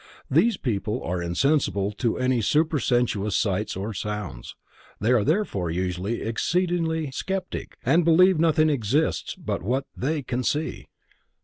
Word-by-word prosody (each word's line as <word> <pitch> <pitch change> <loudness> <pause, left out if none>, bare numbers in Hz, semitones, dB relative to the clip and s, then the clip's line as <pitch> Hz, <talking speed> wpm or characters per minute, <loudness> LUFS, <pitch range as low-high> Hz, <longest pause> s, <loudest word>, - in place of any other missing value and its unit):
Those 230 -4 +3
people 110 0 -2
are 90 +1 -2
insensible 100 - +1
to 115 +2 -1
any 130 -2 +1
supersensuous 125 - +1
sights 105 0 -1
or 100 +4 -4
sounds. 105 -10 -5 0.4
They 110 +4 +1
are 120 -4 +4
therefore 145 - 0
usually 90 +5 -2
exceedingly 160 +4 0
sceptic, 190 +6 -4
and 165 +8 +4
believe 175 +2 +5
nothing 155 -1 +3
exists 140 +4 0
but - - -4
what 125 +9 -1
they 145 +3 -1
can 125 0 -2
see. 150 +5 -2
125 Hz, 130 wpm, -25 LUFS, 105-160 Hz, 0.4 s, believe